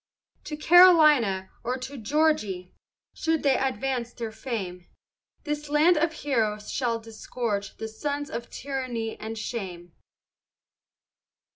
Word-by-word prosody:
To 300 Hz, -, -5 dB
Carolina 305 Hz, -, +6 dB
or 250 Hz, +2 st, -1 dB
to 260 Hz, +2 st, -7 dB
Georg'y, 225 Hz, -, 0 dB, 0.4 s
Should 320 Hz, -1 st, -1 dB
they 275 Hz, -2 st, +4 dB
next 265 Hz, +1 st, +1 dB
advance 255 Hz, -3 st, -3 dB
their 230 Hz, -2 st, -5 dB
fame, 190 Hz, -7 st, -5 dB, 0.6 s
This 295 Hz, 0 st, -4 dB
land 305 Hz, +4 st, +5 dB
of 325 Hz, +1 st, +2 dB
heroes 215 Hz, -8 st, -1 dB
shall 240 Hz, -3 st, 0 dB
disgorge 225 Hz, -2 st, -4 dB
the 220 Hz, -, -4 dB
Sons 285 Hz, +6 st, -4 dB
of 235 Hz, 0 st, -5 dB
tyranny 255 Hz, -5 st, -4 dB
and 225 Hz, +1 st, -6 dB
shame. 180 Hz, -7 st, -6 dB
245 Hz, 120 wpm, -26 LUFS, 215-295 Hz, 0.6 s, Carolina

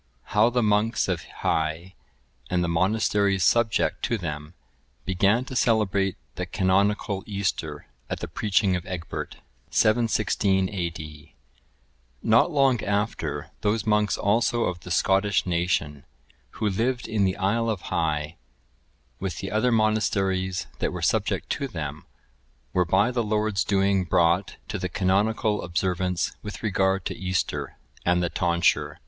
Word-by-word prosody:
How 105 Hz, +3 st, +5 dB
the 120 Hz, 0 st, +1 dB
monks 105 Hz, +2 st, +2 dB
of 90 Hz, -4 st, -1 dB, 0.2 s
Hii, 80 Hz, +4 st, -1 dB, 0.6 s
and 90 Hz, -1 st, +1 dB
the -, -, 0 dB
monasteries 100 Hz, +2 st, +1 dB
subject 115 Hz, +4 st, +2 dB
to 115 Hz, -, 0 dB
them, 75 Hz, -2 st, -6 dB, 0.5 s
began 100 Hz, +6 st, +2 dB
to 130 Hz, -, -7 dB
celebrate 100 Hz, -5 st, +2 dB, 0.2 s
the -, -, -3 dB
canonical 100 Hz, +1 st, +1 dB
Easter 90 Hz, -7 st, -3 dB, 0.2 s
at -, -, -3 dB
the -, -, -5 dB
preaching 100 Hz, -2 st, +1 dB
of 90 Hz, -, -3 dB
Egbert. 90 Hz, -3 st, -5 dB, 0.3 s
[716 105 Hz, -4 st, +2 dB
A.D.] 80 Hz, -5 st, -6 dB, 0.9 s
Not 115 Hz, +8 st, +4 dB
long 135 Hz, -7 st, +2 dB
after, 105 Hz, +2 st, -2 dB
those 105 Hz, +1 st, 0 dB
monks 105 Hz, -1 st, +2 dB
also 115 Hz, +3 st, +2 dB
of 90 Hz, -1 st, -2 dB
the 90 Hz, -, -11 dB
Scottish 95 Hz, +2 st, +2 dB
nation, 85 Hz, -5 st, -1 dB, 0.5 s
who 110 Hz, 0 st, -1 dB
lived 120 Hz, +5 st, -1 dB
in 110 Hz, -2 st, +1 dB
the 95 Hz, 0 st, +1 dB
isle 110 Hz, +4 st, +1 dB
of 105 Hz, -5 st, -2 dB
Hii, 75 Hz, -1 st, -1 dB, 0.8 s
with 95 Hz, -5 st, -3 dB
the 95 Hz, -, -5 dB
other 110 Hz, +4 st, +2 dB
monasteries 95 Hz, -5 st, +1 dB
that -, -, 0 dB
were -, -, -5 dB
subject -, -, 0 dB
to 140 Hz, -, -1 dB
them, 75 Hz, -, -6 dB, 0.7 s
were 90 Hz, -1 st, +2 dB
by 95 Hz, +8 st, +3 dB
the 120 Hz, -1 st, 0 dB
Lord's 105 Hz, -1 st, 0 dB
doing 100 Hz, -1 st, +2 dB
brought 85 Hz, +3 st, +2 dB
to -, -, -4 dB
the -, -, -3 dB
canonical 105 Hz, +3 st, +1 dB
observance 90 Hz, 0 st, -1 dB
with 105 Hz, +1 st, -8 dB
regard 95 Hz, -2 st, +1 dB
to -, -, -3 dB
Easter, 95 Hz, -1 st, -2 dB, 0.3 s
and 90 Hz, 0 st, +2 dB
the 85 Hz, -, -1 dB
tonsure. 85 Hz, -1 st, +1 dB
95 Hz, 140 wpm, -25 LUFS, 90-110 Hz, 0.9 s, How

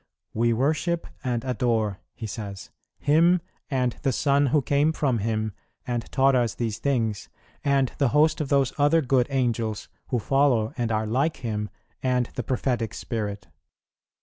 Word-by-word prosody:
"We 115 Hz, +1 st, +2 dB
worship 155 Hz, +8 st, 0 dB, 0.2 s
and 120 Hz, -3 st, -1 dB
adore," 115 Hz, -5 st, 0 dB, 0.2 s
he 120 Hz, -, -6 dB
says, 100 Hz, -3 st, -7 dB, 0.3 s
"Him, 165 Hz, +5 st, +4 dB, 0.3 s
and 125 Hz, -3 st, 0 dB
the 135 Hz, -, +1 dB
Son 140 Hz, +2 st, +2 dB
who 140 Hz, +2 st, +2 dB
came 145 Hz, +4 st, +2 dB
from 135 Hz, -7 st, 0 dB
Him 110 Hz, 0 st, -1 dB, 0.3 s
and 120 Hz, -2 st, -3 dB
taught 135 Hz, 0 st, +4 dB
us 120 Hz, -4 st, +1 dB
these 110 Hz, -3 st, -2 dB
things, 115 Hz, -7 st, -1 dB, 0.3 s
and 135 Hz, -2 st, +2 dB
the 140 Hz, -, +4 dB
host 150 Hz, +5 st, +3 dB
of 145 Hz, -, -3 dB
those 140 Hz, -2 st, +2 dB
other 150 Hz, +3 st, +4 dB
good 125 Hz, -1 st, +2 dB
Angels, 115 Hz, -5 st, -1 dB, 0.2 s
who 125 Hz, -, 0 dB
follow 125 Hz, -2 st, +2 dB
and 120 Hz, -2 st, -1 dB
are 110 Hz, 0 st, 0 dB
like 135 Hz, +9 st, 0 dB
Him, 105 Hz, -2 st, -2 dB, 0.3 s
and 125 Hz, -2 st, 0 dB
the -, -, -3 dB
Prophetic 120 Hz, -3 st, -1 dB
Spirit." 105 Hz, -3 st, -4 dB
125 Hz, 155 wpm, -25 LUFS, 110-140 Hz, 0.3 s, Him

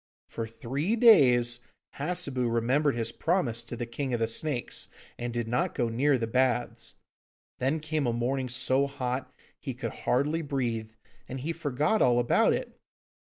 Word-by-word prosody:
For 115 Hz, -1 st, -4 dB
three 135 Hz, -, -2 dB
days 125 Hz, -, +6 dB, 0.4 s
Hassebu 140 Hz, -6 st, 0 dB
remembered 130 Hz, +5 st, +2 dB
his 115 Hz, -1 st, -2 dB
promise 135 Hz, -10 st, 0 dB
to 120 Hz, -, -6 dB
the 120 Hz, -, -4 dB
King 125 Hz, +2 st, -3 dB
of -, -, -2 dB
the 115 Hz, -, +1 dB
Snakes, 125 Hz, +2 st, -2 dB, 0.3 s
and 120 Hz, 0 st, -3 dB
did 120 Hz, -1 st, -2 dB
not 120 Hz, +2 st, 0 dB
go 120 Hz, -2 st, 0 dB
near 135 Hz, +5 st, +2 dB
the 115 Hz, -, -1 dB
baths; 120 Hz, +1 st, 0 dB, 0.6 s
then 135 Hz, +5 st, +1 dB
came 155 Hz, -2 st, -1 dB
a -, -, +2 dB
morning 125 Hz, +2 st, -1 dB
so 135 Hz, +2 st, +2 dB
hot 130 Hz, -1 st, -3 dB, 0.3 s
he 135 Hz, -4 st, -5 dB
could 125 Hz, -, -4 dB
hardly 150 Hz, +6 st, 0 dB
breathe, 120 Hz, -7 st, -2 dB, 0.4 s
and 130 Hz, 0 st, -5 dB
he 165 Hz, +5 st, -2 dB
forgot 150 Hz, -, 0 dB
all 120 Hz, -1 st, +4 dB
about 120 Hz, -1 st, +3 dB
it. -, -, -3 dB
130 Hz, 160 wpm, -28 LUFS, 120-145 Hz, 0.6 s, days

